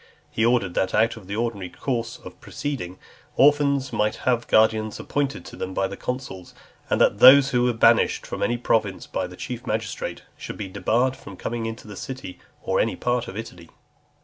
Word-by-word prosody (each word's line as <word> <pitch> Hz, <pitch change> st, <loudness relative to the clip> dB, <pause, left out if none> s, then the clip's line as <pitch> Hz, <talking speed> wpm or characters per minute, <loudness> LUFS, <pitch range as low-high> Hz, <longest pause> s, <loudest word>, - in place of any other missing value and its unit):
He 110 Hz, -, 0 dB
ordered 115 Hz, -6 st, +2 dB
that, 95 Hz, -, 0 dB
out 110 Hz, +2 st, +3 dB
of 110 Hz, -5 st, -13 dB
the 100 Hz, -, -4 dB
ordinary 110 Hz, -5 st, -2 dB
course 115 Hz, -1 st, -3 dB
of -, -, -11 dB
proceeding, 120 Hz, -11 st, -5 dB, 0.4 s
orphans 140 Hz, -1 st, +3 dB
might 105 Hz, 0 st, +1 dB
have 120 Hz, -2 st, +1 dB
guardians 110 Hz, -1 st, +2 dB
appointed 145 Hz, -1 st, -2 dB
them 95 Hz, 0 st, -6 dB
by 95 Hz, -, +1 dB
the 100 Hz, -, -7 dB
consuls; 125 Hz, -9 st, -6 dB, 0.3 s
and -, -, +1 dB
that 105 Hz, -, +3 dB
those 135 Hz, +2 st, +8 dB
who 125 Hz, -, +2 dB
were 125 Hz, -, +2 dB
banished 115 Hz, 0 st, +3 dB
from -, -, -6 dB
any 120 Hz, -, +1 dB
province 110 Hz, -5 st, 0 dB
by -, -, -3 dB
the -, -, -12 dB
chief 125 Hz, 0 st, -6 dB
magistrate, 110 Hz, -6 st, -3 dB
should -, -, -8 dB
be 100 Hz, -, -5 dB
debarred 115 Hz, +7 st, 0 dB
from 100 Hz, -6 st, -12 dB
coming 115 Hz, +2 st, -3 dB
into 115 Hz, -1 st, -7 dB
the 105 Hz, -, -9 dB
City, 130 Hz, -4 st, -7 dB, 0.2 s
or -, -, 0 dB
any -, -, +1 dB
part 120 Hz, -1 st, -1 dB
of 95 Hz, -, -7 dB
Italy. 90 Hz, -7 st, -8 dB
115 Hz, 190 wpm, -24 LUFS, 100-125 Hz, 0.4 s, those